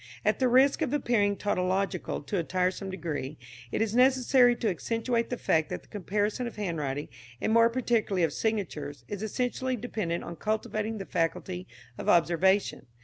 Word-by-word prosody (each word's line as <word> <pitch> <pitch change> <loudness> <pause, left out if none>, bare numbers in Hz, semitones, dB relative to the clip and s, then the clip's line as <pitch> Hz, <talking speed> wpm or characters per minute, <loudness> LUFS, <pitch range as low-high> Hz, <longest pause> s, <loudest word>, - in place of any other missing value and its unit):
At - - +2
the 260 - +3
risk 265 +5 +4
of 290 -3 0
appearing 230 -8 +2
tautological 190 -3 -1
to 195 +6 -2
a - - 0
tiresome 185 +3 -1
degree 155 -6 -4 0.3
it - - +1
is 220 -1 -2
necessary 255 0 +5
to 235 - -2
accentuate 230 +5 -1
the 245 - -2
fact 160 -7 +1
that - - -5
the - - -22
comparison 210 +4 -1
of 235 - -8
handwriting, 150 -8 -3 0.3
and 220 - 0
more 230 0 +6
particularly 230 -6 +1
of 160 -3 +1
signatures, 150 - -3
is 205 -1 -5
essentially 250 +3 -1
dependent 210 -7 -3
on 170 - -7
cultivating 215 0 -2
the 195 - -5
faculty 180 +2 -2 0.3
of - - -2
observation. 175 -2 +3
205 Hz, 165 wpm, -28 LUFS, 175-235 Hz, 0.3 s, more